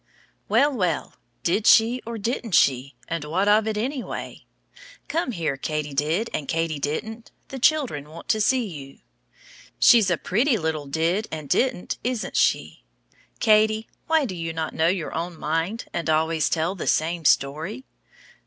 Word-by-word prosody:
Well, 290 +1 +3
well, 180 - -1 0.3
did 205 +5 +1
she 235 +3 +5
or 230 -1 -4
didn't 225 -2 -2
she, 135 0 +2
and 165 -2 -3
what 175 +7 0
of 215 +1 +4
it 215 -1 -1
anyway. 255 +4 -5 0.6
Come 325 -5 -1
here, 165 - -2
Katy 150 0 -3
did 155 +10 0
and 145 - -3
Katy 165 -2 -1
didn't, 220 +11 -4 0.2
the 270 - -6
children 250 - +1
want 165 +2 -11
to 220 - +2
see 250 +3 +2
you. 140 -8 -9 0.8
She's 225 -6 +6
a 175 - +1
pretty 230 - +1
little 160 -4 -3
Did 165 +9 0
and 155 -2 -6
Didn't, 250 - 0
isn't 245 -2 -3
she. - - +1 0.6
Katy, 215 0 +3 0.2
why 320 -2 +3
do 205 - -4
you 165 -1 -4
not 160 -1 -3
know 160 +1 +2
your 175 -2 -1
own 170 +1 -4
mind 165 +9 -2
and 170 -1 -2
always 160 0 +1
tell 165 +2 0
the 195 - -6
same 165 +2 +1
story? 160 - +1
175 Hz, 160 wpm, -24 LUFS, 155-225 Hz, 0.8 s, She's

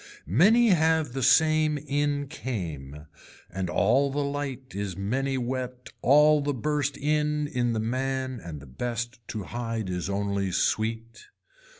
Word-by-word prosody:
Many 210 - +5
have 160 -6 +2
the 135 - -3
same 155 +3 +4
in 145 0 -1
came 80 - -6 0.5
and 95 -1 -3
all 140 +9 +3
the 145 +1 -1
light 140 -2 -4
is 100 -2 -4
many 130 +7 -1
wet 125 0 -4
all 150 +2 +5
the 145 -1 -1
burst 145 +1 -1
in 150 0 0
in 125 -4 -1
the 110 - -1
man 130 +2 -2
and 70 -6 -10
best 120 0 -3
to 105 - -4
hide 115 0 -4
is 90 +1 -3
only 100 -1 -1
sweet. 115 +4 -1
130 Hz, 135 wpm, -27 LUFS, 105-145 Hz, 0.5 s, Many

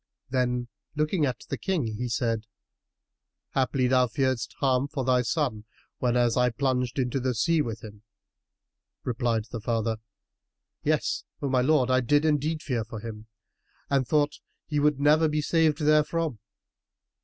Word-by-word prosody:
Then, 125 -2 0 0.3
looking 155 +1 +1
at 125 - -4
the - - -3
King 185 - 0
he 115 +3 -3
said, 115 -1 -1 1.1
"Haply 130 0 +1
thou 125 0 +4
fearedst 120 -2 -1
harm 130 0 +2
for 135 -3 -3
thy 125 -1 +3
son, 125 -5 -1 0.3
whenas 120 -2 +2
I 125 0 +3
plunged 125 -1 -1
into 130 0 0
the 125 -1 -1
sea 160 +8 +2
with 115 -5 -4
him?" 105 -2 -10 1.0
Replied 115 -2 0
the 115 - -5
father, 115 0 -1 0.8
"Yes, - - 0 0.2
O 140 - -2
my 130 -1 +3
lord, 130 -2 +3
I 130 0 +4
did 145 +5 +2
indeed 155 +1 +1
fear 120 -5 -1
for 110 0 -8
him 110 -1 -8 0.6
and 135 -3 +2
thought 150 -1 +1 0.3
he 150 -1 -1
would 150 -1 +2
never 150 +3 +4
be 150 0 0
saved 155 0 +2
therefrom." 155 -3 +2
130 Hz, 150 wpm, -27 LUFS, 120-150 Hz, 1.1 s, thou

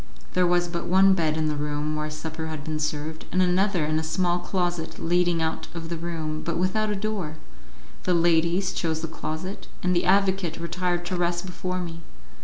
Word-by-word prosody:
There 180 -1 +4
was 175 0 +3
but 170 0 -3
one 190 +2 +6
bed 160 -4 +1
in 155 -1 +1
the 150 - 0
room 150 +1 -1
where 155 0 -2
supper 160 +1 -5
had 155 -2 -5
been 155 0 -2
served, 155 +1 -3
and 185 - +1
another 185 -1 +3
in 155 +1 +1
a - - -2
small 175 +2 +1
closet 175 -2 -2
leading 175 -1 +2
out 160 0 -2
of 165 -1 -5
the 170 - -2
room, 160 -2 -3
but 170 - -2
without 210 +5 +1
a 210 - 0
door. 195 -7 -3 0.7
The 180 - +3
ladies 170 +2 +3
chose 160 -2 -1
the 165 - -2
closet, 160 +4 -5 0.2
and 180 0 +2
the 175 - +2
advocate 190 -3 +3
retired 175 +1 -1
to 185 - -2
rest 175 0 0
before 185 0 -3
me. 170 -1 -6
170 Hz, 200 wpm, -26 LUFS, 160-180 Hz, 0.7 s, one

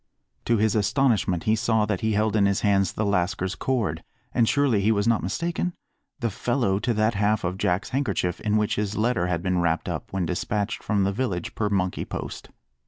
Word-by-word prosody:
To 115 - +2
his 110 0 +2
astonishment 105 -4 +1
he 110 - +3
saw 110 -1 +1
that 105 -3 -2
he 110 0 +1
held 110 +1 +1
in 100 -2 +4
his 100 -1 0
hands 100 -3 +2
the 110 - -1
lascar's 95 -1 0
cord, 105 -14 -1 0.3
and 115 -2 +3
surely 140 -8 +2
he 105 +3 +3
was 100 0 +1
not 115 -2 +3
mistaken? 170 - -2 0.5
the 115 -2 0
fellow 115 -3 0
to 120 +2 0
that 110 +2 +2
half 105 +1 +1
of 90 +2 -2
Jack's 90 +6 0
handkerchief 125 -10 -1
in 105 0 +1
which 105 -1 0
his 105 0 -2
letter 110 -5 +1
had 85 -1 -1
been 90 -1 +1
wrapped 80 -1 0
up - - -4
when 95 -2 -1
despatched 100 +4 -2
from 100 -2 +1
the 95 - +1
village 95 -7 -2
per 105 -2 -1
monkey 95 -3 0
post. - - -6
105 Hz, 205 wpm, -25 LUFS, 95-110 Hz, 0.5 s, in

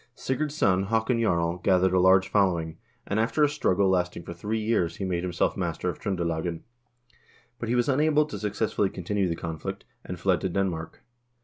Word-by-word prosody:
Sigurd's 145 +3 -2
son, 95 -5 +2
Haakon 115 +3 +1
Jarl, 85 -5 +1
gathered 95 0 +2
a 95 - +4
large 95 +1 +5
following, 85 -6 +1 0.3
and 100 - -1
after 125 +7 +2
a - - +6
struggle 100 -10 +1
lasting 90 -2 0
for 85 - -7
three 105 +6 -3
years 105 -7 0
he 100 - -4
made 90 -2 -1
himself 90 -1 0
master 90 -1 -2
of 85 - -5
Tr0ndelagen. 85 -4 -2 1.0
But 115 - -4
he 120 - +1
was 120 -1 +2
unable 150 +2 +3
to - - -7
successfully 105 -1 0
continue 95 +1 -1
the 85 - -1
conflict, 80 -2 -6 0.2
and 90 -1 -7
fled 90 0 +1
to 95 - -1
Den 95 +2 +1
mark. 80 -2 -7
95 Hz, 190 wpm, -26 LUFS, 85-110 Hz, 1.0 s, a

